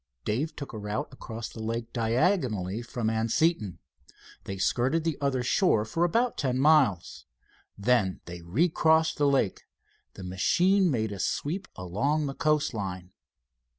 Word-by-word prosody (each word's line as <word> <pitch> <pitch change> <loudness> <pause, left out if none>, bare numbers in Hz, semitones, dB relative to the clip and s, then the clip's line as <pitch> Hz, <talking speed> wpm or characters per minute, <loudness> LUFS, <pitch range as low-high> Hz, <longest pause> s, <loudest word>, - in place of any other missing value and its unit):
Dave 145 +9 -1
took 140 -4 -7
a 110 - -5
route 105 +1 -3
across 115 -3 -7
the 110 - -9
lake 115 +1 -4
diagonally 115 - 0
from 120 -1 -4
Anseton. 110 - +1 0.7
They 95 - -5
skirted 130 - +1
the 165 -2 0
other 135 -3 0
shore 125 - +2
for 165 +9 -1
about 230 +8 +1
ten 130 -3 0
miles. 135 - +2 0.5
Then 100 -3 +1
they 85 0 -8
recrossed 160 - +2
the 145 - +3
lake. 130 -8 0 0.5
The - - -9
machine 180 - +2
made 110 -6 -1
a 100 - -6
sweep 155 - -2
along 110 - -1
the 135 - -3
coast 150 -2 +1
line. 95 -4 -5
120 Hz, 145 wpm, -28 LUFS, 105-155 Hz, 0.7 s, the